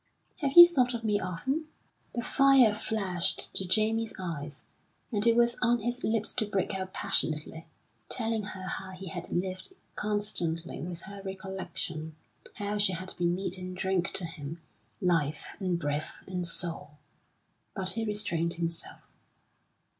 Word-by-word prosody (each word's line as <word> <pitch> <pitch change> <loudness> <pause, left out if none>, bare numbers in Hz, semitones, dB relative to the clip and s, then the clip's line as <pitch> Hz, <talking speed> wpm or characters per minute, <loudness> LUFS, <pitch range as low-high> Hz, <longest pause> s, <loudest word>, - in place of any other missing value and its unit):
"Have 280 -3 -1
you 345 0 +13
thought 250 -7 +2
of 230 - -5
me 210 -2 +2
often?" 260 - -2 0.5
The 240 - -1
fire 270 -6 +5
flashed 200 -5 +1
to 190 - +7
Jamie's 220 +4 +2
eyes, 150 -5 -5 0.5
and 210 0 +2
it 230 - +5
was 240 0 +3
on 240 -1 +3
his 240 +3 -3
lips 220 -1 +1
to 215 - +1
break 200 0 -1
out 190 -1 -4
passionately, 160 0 0 0.4
telling 225 -2 0
her 190 -2 -7
how 190 0 -5
he 185 0 -8
had 175 +1 -6
lived 185 - -2 0.2
constantly 205 -7 -2
with 170 +1 -5
her 200 +1 -9
recollection, 190 -5 -5 0.4
how 205 0 -2
she 200 -2 +4
had 185 +2 -4
been 175 0 +2
meat 190 0 -3
and 185 0 -6
drink 190 -1 0
to 185 - +1
him, 165 -1 -7 0.4
life, 155 -4 0
and 185 -3 0
breath, 145 -1 -3
and 180 -2 -2
soul; 165 -3 -3 0.8
but 190 -2 +2
he 225 - -1
restrained 185 -6 -1
himself. 170 0 -5
190 Hz, 150 wpm, -29 LUFS, 170-215 Hz, 0.8 s, you